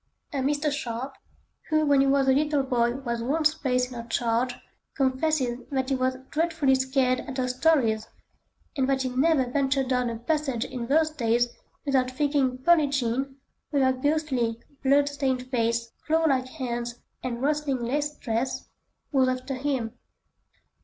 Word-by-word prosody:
A - - -2
Mr. 290 +3 +1
Sharpe, 260 -1 -4 0.6
who 310 0 +3
when 285 -2 +4
he 275 - +3
was 270 0 +3
a - - +6
little 295 0 +2
boy 240 -2 +1
was 240 -3 -3
once 305 +5 +2
placed 250 -4 0
in - - -7
her 230 - -13
charge, 235 +2 0 0.4
confesses 260 -2 +1
that 265 -1 -1
he 270 - +2
was 255 0 0
dreadfully 320 -3 +2
scared 260 -1 +2
at 270 -2 -7
her 255 -1 0
stories, 250 -5 +2 0.7
and 265 -2 +1
that 265 -1 +1
he 260 - -1
never 265 +2 +3
ventured 270 0 0
down 250 -2 +1
a 230 - -4
passage 265 -1 -1
in 240 -2 -5
those 310 +3 +3
days 240 -4 +1 0.4
without 265 -3 +2
thinking 275 -1 +1
"Pearlin' 305 +2 +4
Jean," 270 0 -1 0.4
with 280 -2 +2
her 260 0 +4
ghostly, 260 -4 0 0.2
blood 280 +1 +4
stained 270 -3 -1
face, 230 -1 0 0.2
clawlike 310 -5 +2
hands, 240 -4 -4 0.3
and 245 0 -4
rustling 290 -4 0
lace 290 +4 0
dress, 230 +3 -3 0.4
was 265 -3 +3
after 255 +2 -3
him. 260 -4 -2
265 Hz, 160 wpm, -26 LUFS, 250-285 Hz, 0.7 s, a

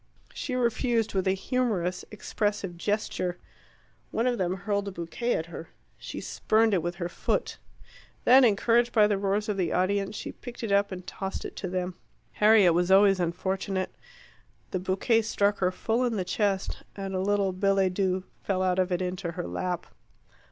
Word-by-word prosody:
She 255 - -4
refused, 235 -2 +1
with 190 -1 0
a 190 - +4
humorous, 195 -6 -1
expressive 205 -3 -2
gesture. 185 -2 -2 0.7
One 230 - -1
of 245 -2 +1
them 185 0 0
hurled 200 +1 -2
a - - -3
bouquet 180 +8 -2
at 160 - -2
her. 165 -1 -9 0.3
She - - -6
spurned 220 0 +1
it 185 - +2
with 175 +2 -3
her 175 -1 -3
foot. 175 - -2 0.7
Then, 260 +2 +8
encouraged 235 +2 +3
by 215 -3 +6
the 205 -2 +1
roars 200 +1 0
of 210 -2 -1
the 185 - 0
audience, 195 +2 0
she - - -5
picked 245 -1 -10
it 220 - -2
up 200 0 +3
and 180 -1 -7
tossed 195 +1 -5
it - - -7
to 190 - -3
them. 180 0 -2 0.4
Harriet 210 - +5
was 175 +2 +1
always 195 0 +6
unfortunate. 190 +2 -2 0.8
The 185 - -1
bouquet 190 +5 +2
struck 205 -1 +1
her 185 -1 +2
full 225 +6 0
in 240 -2 0
the 185 -3 -1
chest, 195 -1 -1
and 195 -1 -5
a 185 - 0
little 200 0 +1
billet 195 -1 +2
doux 185 -1 0 0.2
fell 185 -2 0
out 185 0 +1
of 185 0 +1
it 180 +1 0
into 180 -1 -3
her 175 0 -4
lap. 180 -2 -3
195 Hz, 180 wpm, -27 LUFS, 185-210 Hz, 0.8 s, Then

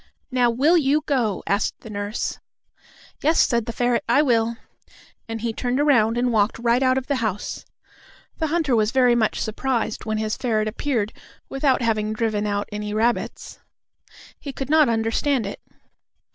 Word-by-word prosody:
"Now 250 -1 +3
will 285 +9 +3
you 300 0 +2
go?" 235 -9 0
asked 200 +1 -1
the 225 - -10
nurse. 205 +2 -3 0.8
"Yes," 315 +3 +2
said 235 -1 +2
the - - -2
ferret, 245 0 0
"I 285 +5 +5
will," 230 -3 +1 0.7
and 225 -1 -4
he 230 -1 -2
turned 245 +3 -1
around 240 -6 +3
and 245 0 +1
walked 210 0 +2
right 235 +2 +2
out 260 0 +3
of 265 - -2
the 280 -1 -1
house. 215 -5 -3 0.7
The 320 - 0
hunter 310 -5 +1
was 215 -1 +2
very 250 -1 +4
much 225 -3 +1
surprised 235 0 -2
when 215 0 -1
his 215 0 -2
ferret 220 -4 0
appeared 225 -1 -2 0.4
without 270 -2 +1
having 215 -2 0
driven 215 -2 -1
out 205 0 -1
any 210 0 -4
rabbits. 235 +2 -1 0.8
He 280 - -6
could 270 +1 -5
not 310 -4 +5
understand 225 +3 0
it. 200 - -6
235 Hz, 165 wpm, -23 LUFS, 215-265 Hz, 0.8 s, I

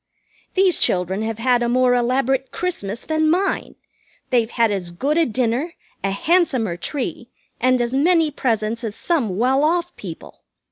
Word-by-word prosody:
These 375 -2 +3
children 185 +2 +1
have 220 0 -3
had 245 +1 +2
a 240 - 0
more 250 0 +3
elaborate 260 +2 +1
Christmas 230 - -4
than 315 0 +1
mine. 375 +4 0 0.6
They've 235 -3 +2
had 230 -2 +2
as 190 -4 -3
good 270 - -1
a 330 -1 +3
dinner, 250 +7 -1 0.3
a 195 - +1
handsomer 255 - +1
tree, 275 - -5 0.3
and 255 +1 +3
as 240 +1 -1
many 320 +2 +3
presents 230 -3 -1
as 220 -2 -4
some 240 - -1
well 260 +5 +2
off 345 +2 0
people. 170 -5 -10
250 Hz, 155 wpm, -21 LUFS, 225-315 Hz, 0.6 s, These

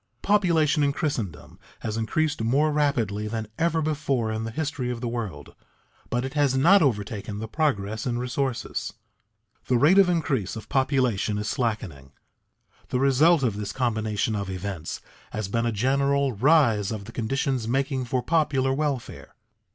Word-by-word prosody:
Population 170 -7 +3
in 140 -1 +2
Christendom 135 - -4 0.2
has 110 - -3
increased 145 +6 -1
more 140 +7 +2
rapidly 115 -9 0
than 110 0 -4
ever 165 -1 +1
before 140 -7 -1
in 110 0 -3
the - - -3
history 140 0 -3
of 120 -1 -3
the 120 - -3
world, 115 -5 -5 0.6
but 120 +2 -1
it 130 - -5
has 145 -3 +2
not 185 +9 +6
overtaken 105 -5 -1
the 110 +1 -5
progress 110 -7 -1
in 120 -1 -1
resources. 125 0 -2 0.7
The 125 - +3
rate 160 +10 +5
of 190 -2 +6
increase 145 - 0
of 110 - -9
population 130 -7 +1
is 105 +1 -3
slackening. 100 - -3 0.8
The 125 - 0
result 140 +4 +4
of 110 -5 0
this 105 -1 -4
combination 110 -3 -1
of 100 -2 -3
events 95 -3 -5 0.3
has 105 -2 -3
been 115 +3 0
a - - +1
general 140 +4 +1
rise 115 -4 +3
of 105 -3 -5
the 115 - -9
conditions 125 +1 -1
making 135 +1 0
for 125 +1 -1
popular 140 -4 +1
welfare. 140 -3 -3
125 Hz, 160 wpm, -25 LUFS, 110-145 Hz, 0.8 s, not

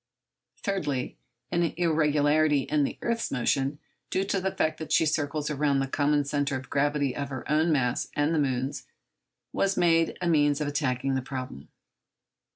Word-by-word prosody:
Thirdly, 150 - -2 0.4
an 170 - +1 0.2
irregularity 155 -3 +3
in 150 +2 0
the - - -5
earth's 235 -1 -1
motion, 135 +3 0 0.3
due 190 - 0
to 195 -1 -1
the 190 +1 -1
fact 155 -3 -1
that 160 - -6
she - - +4
circles 150 0 -1
around 145 -1 +1
the 135 - +1
common 145 +1 +1
centre 140 0 -1
of 130 - -10
gravity 145 -2 +1
of 140 -1 -3
her 130 -3 -6
own 155 +2 +2
mass 125 -5 +1
and 145 +2 +1
the 160 - +2
moon's, 130 -1 -2 0.7
was 195 0 +1
made 165 -2 +3
a 180 - -2
means 145 -3 +3
of 150 - -1
attacking 135 -2 -1
the 130 - 0
problem. 130 - -7
145 Hz, 165 wpm, -27 LUFS, 135-160 Hz, 0.7 s, she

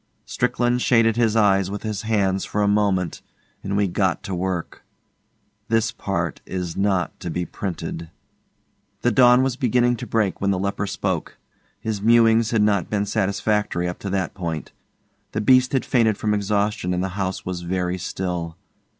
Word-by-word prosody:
Strickland 120 +1 0
shaded 115 -3 +3
his 115 -2 +2
eyes 100 -3 +3
with 100 0 -5
his 110 -3 -3
hands 100 -4 +1
for 105 - -1
a - - +2
moment 100 -4 +1 0.4
and 100 +1 -2
we 100 -1 +2
got 95 0 0
to 95 - -5
work. 90 -1 -3 0.8
This 115 0 +1
part 85 - -3
is 90 -3 -4
not 95 -4 0
to - - -5
be 90 +2 -2
printed. 85 -3 -5 0.9
The 120 - +3
dawn 125 +3 +6
was 130 -2 0
beginning 120 -1 +2
to 120 +1 -7
break 110 -4 0
when 100 - +1
the 95 - +1
leper 100 +2 -2
spoke. - - -3 0.4
His 110 -3 -3
mewings 115 0 +4
had 115 -3 +2
not 100 -3 +1
been 105 -1 0
satisfactory 100 -2 0
up 90 - -5
to 100 - -5
that 95 -2 -1
point. 85 -5 -5 0.6
The 110 - -1
beast 130 +3 +4
had 135 - 0
fainted 110 -5 +2
from 105 -1 0
exhaustion 100 -2 0
and 90 - -1
the 95 - -1
house 95 0 -3
was 90 -1 -4
very 90 +1 -2
still. 90 -2 -4
100 Hz, 170 wpm, -22 LUFS, 90-110 Hz, 0.9 s, dawn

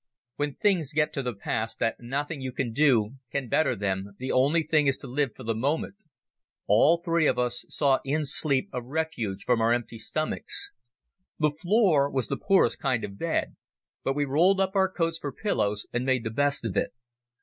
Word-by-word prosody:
When 145 -1 -2
things 175 -8 +1
get 150 0 +1
to 140 - -2
the 125 -3 -3
pass 110 +3 -3
that 115 - -1
nothing 140 +4 -3
you 130 -1 -4
can 125 -2 -3
do 130 -4 +3
can 140 0 -2
better 155 - +2
them, 95 0 -3
the 130 +3 -4
only 145 +6 +3
thing 155 -1 +2
is 135 - +2
to - - -10
live 130 -2 -1
for 130 - -10
the 115 0 -1
moment. 140 +11 -1 0.7
All 130 +11 +5
three 170 -2 +1
of - - +1
us 125 0 -1
sought 140 -3 +2
in 150 +3 -1
sleep 140 +2 +3
a 125 - -2
refuge 125 -7 -3
from 120 -2 +2
our 115 +1 +3
empty 120 -1 -2
stomachs. 155 +7 -1 0.7
The 150 -1 +2
floor 170 -3 +2
was 130 -5 -2
the - - 0
poorest 195 -1 +2
kind 130 -5 0
of 100 0 -7
bed, - - -1 0.5
but 135 - 0
we 145 0 +1
rolled 170 +8 +3
up 190 -1 +1
our 190 -1 +3
coats 165 -2 -1
for 145 - -4
pillows 105 - -1
and 120 +1 0
made 130 -2 +1
the 110 - -3
best 140 +1 +1
of 110 - -3
it. - - 0
135 Hz, 200 wpm, -27 LUFS, 120-155 Hz, 0.7 s, All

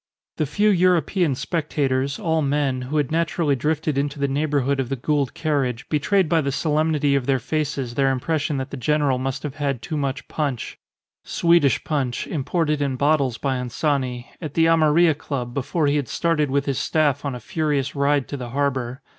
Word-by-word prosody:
The 155 - 0
few 210 +8 +2
European 180 -4 +2
spectators, 140 -3 -1
all 160 -1 0
men, 140 -2 0
who 155 - -1
had 145 -2 0
naturally 165 -2 +1
drifted 150 +1 0
into 140 +1 -2
the 140 0 0
neighbourhood 140 -1 0
of 130 -2 -1
the 135 - -1
Gould 140 +1 -1
carriage, 135 -6 -1
betrayed 170 +5 +2
by 160 +1 +2
the 140 -1 -1
solemnity 150 -1 +1
of 135 -3 0
their 135 -1 +3
faces 135 -1 -2
their 135 +1 +2
impression 145 +3 -1
that 130 0 -4
the 140 - -5
general 140 0 +1
must 130 0 -3
have 150 -1 -5
had 140 -4 -1
too 155 - -3
much 140 -1 -3
punch 140 -6 -3 0.4
(Swedish 170 -5 +3
punch, 135 -6 -1
imported 150 0 -1
in 140 -2 0
bottles 140 -3 +1
by 135 -2 -1
Anzani) 125 0 -1 0.2
at 155 -4 -6
the 165 - +4
Amarilla 165 0 +4
Club 125 -5 -4
before 145 +4 -1
he 145 +1 +2
had 140 -4 -2
started 165 -4 0
with 140 +1 0
his 140 -3 -1
Staff 145 -3 +1
on 140 -3 -3
a - - -6
furious 145 +1 -1
ride 140 -2 +1
to 145 - -4
the 125 -2 -6
harbour. 130 -1 -2
145 Hz, 190 wpm, -22 LUFS, 135-155 Hz, 0.4 s, the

